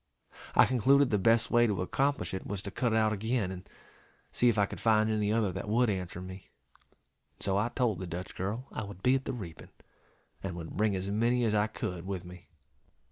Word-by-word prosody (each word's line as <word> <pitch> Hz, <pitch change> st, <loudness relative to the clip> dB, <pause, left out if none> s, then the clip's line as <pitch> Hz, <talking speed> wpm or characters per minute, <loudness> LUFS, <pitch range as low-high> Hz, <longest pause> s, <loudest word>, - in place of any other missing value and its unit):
I -, -, +8 dB
concluded 130 Hz, +2 st, +4 dB
the 105 Hz, -, +2 dB
best 115 Hz, +3 st, +3 dB
way 120 Hz, 0 st, +5 dB
to 100 Hz, -4 st, -1 dB
accomplish 140 Hz, +7 st, 0 dB
it 95 Hz, -, -5 dB
was 100 Hz, -1 st, -4 dB
to 100 Hz, -, -5 dB
cut 120 Hz, +4 st, 0 dB
out 110 Hz, -1 st, +3 dB
again, 110 Hz, -1 st, -1 dB
and 90 Hz, -1 st, -9 dB, 0.6 s
see 120 Hz, -, +3 dB
if 115 Hz, -, +1 dB
I 100 Hz, -, +4 dB
could -, -, -8 dB
find 110 Hz, -1 st, +3 dB
any 105 Hz, -1 st, +1 dB
other 110 Hz, -3 st, +1 dB
that 105 Hz, -, -5 dB
would 120 Hz, +1 st, +3 dB
answer 90 Hz, -2 st, -4 dB
me; 95 Hz, +1 st, -9 dB, 0.9 s
and -, -, -11 dB
so 95 Hz, -1 st, 0 dB
I 105 Hz, +4 st, +1 dB
told 120 Hz, -7 st, 0 dB
the 95 Hz, -, -5 dB
Dutch 90 Hz, +2 st, -6 dB
girl 105 Hz, +7 st, -3 dB
I -, -, -4 dB
would 100 Hz, -2 st, -10 dB
be 125 Hz, -, +4 dB
at 135 Hz, 0 st, 0 dB
the -, -, -2 dB
reaping, 90 Hz, -9 st, -8 dB, 0.7 s
and 95 Hz, -3 st, -4 dB
would 80 Hz, -2 st, -7 dB
bring 105 Hz, 0 st, +1 dB
as 95 Hz, +1 st, -3 dB
many 120 Hz, +4 st, +2 dB
as 110 Hz, -2 st, +1 dB
I 105 Hz, 0 st, +3 dB
could 90 Hz, -4 st, -5 dB
with 95 Hz, -3 st, -4 dB
me. 90 Hz, 0 st, -12 dB
105 Hz, 220 wpm, -30 LUFS, 95-115 Hz, 0.9 s, I